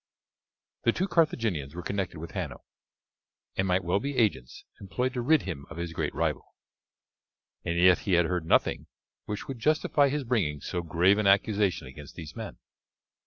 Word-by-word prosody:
The 115 - +3
two 190 - -1
Carthaginians 110 - +1
were 90 - -5
connected 95 -4 -3
with 85 +2 -7
Hanno, 85 -10 -5 0.9
and 95 - 0
might 90 +1 +2
well 90 +3 +1
be 140 +4 -4
agents 95 - 0
employed 125 +6 -2
to 125 - -2
rid 155 +5 +3
him 75 -7 -6
of 85 - -9
his 85 -1 -4
great - - -2
rival. - - -2 1.1
And 85 - -1
yet 90 +1 +6
he 100 - -1
had 85 -1 +5
heard 85 -1 -2
nothing - - +2 0.4
which 105 -1 -5
would 135 -3 -6
justify 150 +1 +3
his 145 +1 -1
bringing 100 - 0
so 90 - -3
grave 85 +5 +3
an 105 - +2
accusation 100 -4 +2
against 70 +3 -11
these 80 -3 -9
men. - - -7
95 Hz, 170 wpm, -28 LUFS, 85-115 Hz, 1.1 s, yet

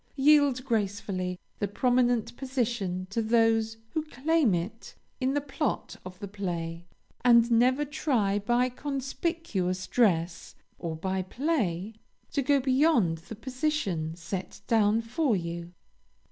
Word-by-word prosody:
Yield 280 -2 +4
gracefully 200 -5 -1 0.2
the 205 - 0
prominent 245 +2 +1
position 235 -9 -2
to 230 - 0
those 225 0 +2
who 315 - 0
claim 305 - +2
it 195 +7 -5 0.2
in 265 +1 0
the - - +3
plot 290 +1 -3
of 185 0 -9
the 200 - -6
play, 175 -4 -4 0.4
and 235 -1 +6
never 255 +5 +4
try 235 -9 0
by 240 +4 +2
conspicuous 265 - -2
dress 175 -8 +1 0.2
or 165 -2 -3
by 190 +3 -2
play, 215 - -1 0.4
to 285 - +1
go 280 +1 +3
beyond 260 - +3
the 175 +7 -9
position 240 - -2
set 180 +3 -6
down 220 -1 +3
for 245 +2 0
you. 170 -1 -4
225 Hz, 125 wpm, -28 LUFS, 185-265 Hz, 0.4 s, and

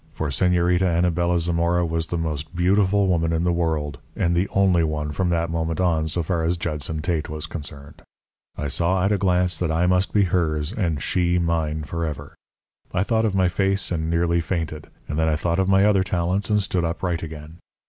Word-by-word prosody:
For 80 - -3
Señorita 90 +4 +2 0.2
Anabela 85 0 +1
Zamora 85 +1 +1
was 80 0 -2
the 85 - -2
most 80 0 -4
beautiful 100 +3 +3
woman 85 -3 +1
in 80 0 0
the 90 - +2
world, 80 -4 -1 0.2
and 85 0 +1
the 90 +4 +1
only 95 -3 +3
one 75 -1 -2
from 90 +4 -1
that 85 -1 0
moment 80 0 -2
on, 80 -4 +1
so 85 +2 -1
far 85 0 -1
as 85 +2 +1
Judson 75 -1 -3
Tate 85 -3 -1
was 75 0 -4
concerned. 75 -3 -7 0.6
I 75 - -2
saw 90 +6 +1
at 100 - +2
a 105 - +1
glance 90 -2 +1
that 90 -3 0
I 80 +2 +1
must 90 +1 +2
be 105 - +3
hers 80 -2 0
and 85 - -1
she 90 -1 +1
mine 80 -3 -1
forever. 80 0 -5 0.6
I 90 - +1
thought 110 +1 +1
of 105 -3 0
my 95 -1 +3
face 95 +2 0
and 80 -2 -1
nearly 85 0 +1
fainted; 80 -3 -4 0.2
and 75 +2 -3
then 80 - +2
I 80 - +2
thought 85 +3 -1
of 95 0 +1
my 95 +1 +5
other 105 -2 +4
talents 95 +3 -1
and 105 -1 +2
stood 90 -2 -1
upright 85 +1 -2
again. 80 +1 -9
85 Hz, 205 wpm, -23 LUFS, 80-90 Hz, 0.6 s, my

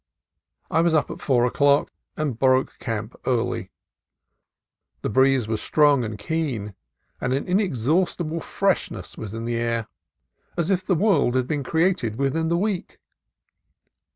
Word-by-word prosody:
I 165 - +3
was 170 -1 +3
up 155 - +1
at - - -8
four 125 -3 +3
o'clock, 140 +3 +3 0.3
and 145 -7 -2
broke 130 0 +2
camp 110 -1 -4
early. 125 -2 0 1.3
The - - 0
breeze 130 -1 +3
was 110 -1 -2
strong 145 -4 +3
and 105 -2 -4
keen, 115 -4 -3 0.5
and 125 - 0
an 135 - -1
inexhaust 180 - +1
ible 165 -1 -3
freshness 195 +3 -1
was 110 -1 -7
in 115 0 -4
the 120 0 -1
air, 115 -1 -1 0.7
as 170 +2 0
if 185 -1 +1
the 185 0 +1
world 190 - +3
had 130 -1 +2
been 145 +2 -2
created 160 - +1
within 140 +5 0
the 170 +1 +1
week. 200 0 -2
135 Hz, 150 wpm, -24 LUFS, 120-165 Hz, 1.3 s, I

